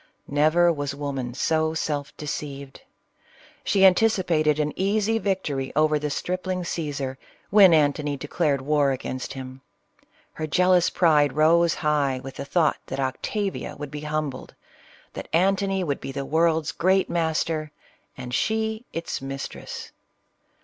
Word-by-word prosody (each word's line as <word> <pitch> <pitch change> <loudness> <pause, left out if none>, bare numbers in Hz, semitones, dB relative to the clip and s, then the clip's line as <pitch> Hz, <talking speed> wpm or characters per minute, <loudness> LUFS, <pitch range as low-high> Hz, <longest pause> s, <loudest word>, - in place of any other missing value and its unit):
Never 155 +4 +3
was 145 -2 -4
woman 135 -4 -4
so 160 +2 +1
self 145 -3 -3
deceived. 140 -2 -6 0.8
She 195 - +2
an 190 -1 +9
ticipated 175 -8 +2
an 150 0 0
easy 215 +3 +1
victory 155 -10 -2
over 155 0 +3
the 150 0 -2
stripling 185 +4 -3
Caesar, 140 -6 -4 0.3
when 200 -3 +8
Antony 145 -2 +2
declared 145 -1 -1
war 145 0 +2
against 130 0 -4
him. 130 -1 -8 0.7
Her 155 - -4
jealous 180 +3 +3
pride 150 -5 +3
rose 165 +3 +4
high 145 -4 0
with 135 0 -9
the - - -5
thought 160 +1 +2
that 135 - -5
Octavia 195 +9 -3
would 145 -2 -7
be 150 0 -6
humbled, 150 -3 -4 0.3
— - - -27
that - - -7
Antony 195 +2 +2
would 145 -5 -2
be - - -5
the 135 0 -4
world's 160 +1 +1
great 190 +2 +2
master, 160 -2 -1 0.5
and 125 -1 -7
she 220 - -1
its 165 -4 -4
mistress. 135 0 -7
155 Hz, 140 wpm, -24 LUFS, 140-175 Hz, 0.8 s, an